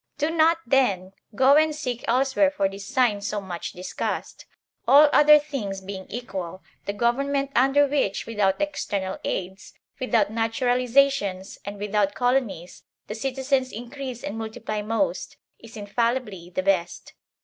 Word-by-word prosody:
Do 300 +2 0
not, 325 0 +4
then, 195 -9 +1 0.2
go 265 +3 +5
and 310 0 +3
seek 250 -6 -4
elsewhere 265 +4 +3
for 280 -9 0
this 195 0 -8
sign 230 -5 +1
so 205 +1 -2
much 185 -3 -6
discussed. 180 +1 -5 0.4
All 290 +2 +7
other 300 0 +8
things 270 -10 -4
being 190 0 -8
equal, 190 -6 -6 0.2
the 200 - -1
government 275 +5 0
under 270 +3 +4
which, 275 -8 -1
without 205 -4 0
external 200 -10 -2
aids, 190 +1 -5 0.3
without 240 -5 +1
naturalizations, 235 -3 +1
and 200 +1 -6
without 205 0 0
colonies, 245 -9 -1 0.2
the - - -6
citizens 265 +2 -1
increase 245 +2 -7
and 210 +3 -5
multiply 220 -1 -4
most, 225 +7 -2 0.2
is 225 -1 -12
infallibly 210 -3 -2
the 185 +1 -3
best. 185 -3 -1
230 Hz, 140 wpm, -24 LUFS, 195-270 Hz, 0.4 s, other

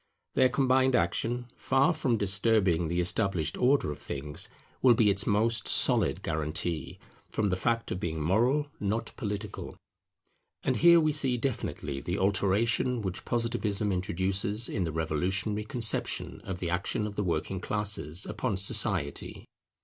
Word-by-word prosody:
Their 130 -1 +4
combined 130 0 +2
action, 115 +7 0
far 135 +6 +2
from 120 -7 0
disturbing 100 -4 +1
the 85 +2 -1
established 90 -3 0
order 130 - +2
of 75 - -8
things, 75 +1 -4 0.3
will 125 -2 +6
be 110 -2 +4
its 100 - +1
most 110 +1 +2
solid - - +4
guarantee, 80 +1 -2 0.3
from 105 -2 -1
the 90 - +1
fact 115 +5 -1
of 90 - -2
being 80 -5 -3
moral, 120 - +2
not 105 +3 -2
political. 105 -3 -5 0.9
And - - 0
here 170 0 +7
we 155 -1 +2
see 135 -4 +2
definitely 75 - -3
the 90 +2 -3
alteration 105 +5 +1
which 95 -2 -4
Positivism 110 -3 -1
introduces 95 +4 -1
in 95 -5 -1
the 80 - -3
revolutionary 95 +7 -1
conception 115 0 -1
of 95 - -4
the 85 -2 -3
action 90 +4 -1
of 105 - -5
the 105 - -1
working 90 +2 -2
classes 100 -4 -2
upon 105 -2 -2
society. 70 -6 0
100 Hz, 145 wpm, -29 LUFS, 90-115 Hz, 0.9 s, here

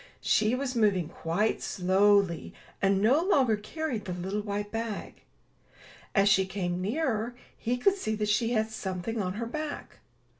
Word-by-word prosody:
She 215 +3 +3
was 260 -1 -3
moving 200 -8 +2
quite 175 +7 -1
slowly, 190 -1 +2 0.3
and 195 0 +3
no 265 +8 +5
longer 270 - +3
carried 225 +1 -4
the 185 - -3
little 190 +4 -3
white 205 0 -4
bag. 225 -2 -5 0.9
As 200 -1 +5
she 195 -2 +4
came 180 -2 -2
nearer, 235 - -1 0.2
he 245 +2 -1
could 390 +10 +3
see 220 - -2
that 210 0 -1
she 230 +3 +2
had 220 -1 0
something 205 +2 -3
on 185 -1 -2
her 230 +4 -3
back. 305 +5 -6
210 Hz, 155 wpm, -29 LUFS, 195-235 Hz, 0.9 s, no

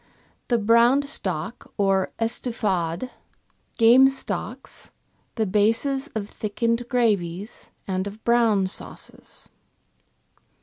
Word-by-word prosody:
The 240 - +2
brown 235 +5 +4
stock 190 - -2
or 195 -2 +1
" - - -45
estouffade," 220 -4 -2 0.7
game 245 +3 +7
stocks, 270 - -4 0.5
the 220 - 0
bases 230 +8 +1
of 205 -2 -3
thickened 230 +3 -2
gravies 205 -5 -1 0.2
and 190 0 -2
of 210 +2 -10
brown 230 -5 +3
sauces. 185 - -2
225 Hz, 95 wpm, -24 LUFS, 195-240 Hz, 0.7 s, game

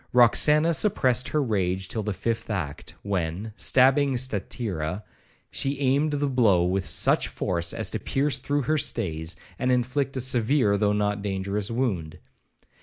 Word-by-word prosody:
Roxana 150 +7 +4
suppressed 130 - +2
her 150 -1 0
rage 95 -5 -1
till 110 - -3
the 105 0 -3
fifth 115 +5 -3
act, 85 -10 -5
when, 95 +2 -3
stabbing 135 +2 +3
Statira, 100 -7 -3 0.5
she 135 0 -2
aimed 140 +3 +1
the 145 0 0
blow 110 -10 +3
with 95 +1 -1
such - - +3
force 85 -2 -2
as - - -1
to - - -3
pierce 140 +1 -1
through 145 0 -1
her 155 +3 +1
stays, 80 - -1 0.2
and 130 0 +1
inflict 130 +2 -1
a - - 0
severe 125 -3 +2
though 105 0 +1
not 105 0 -1
dangerous 100 +1 -3
wound. 105 -11 -2
115 Hz, 150 wpm, -25 LUFS, 95-135 Hz, 0.5 s, Roxana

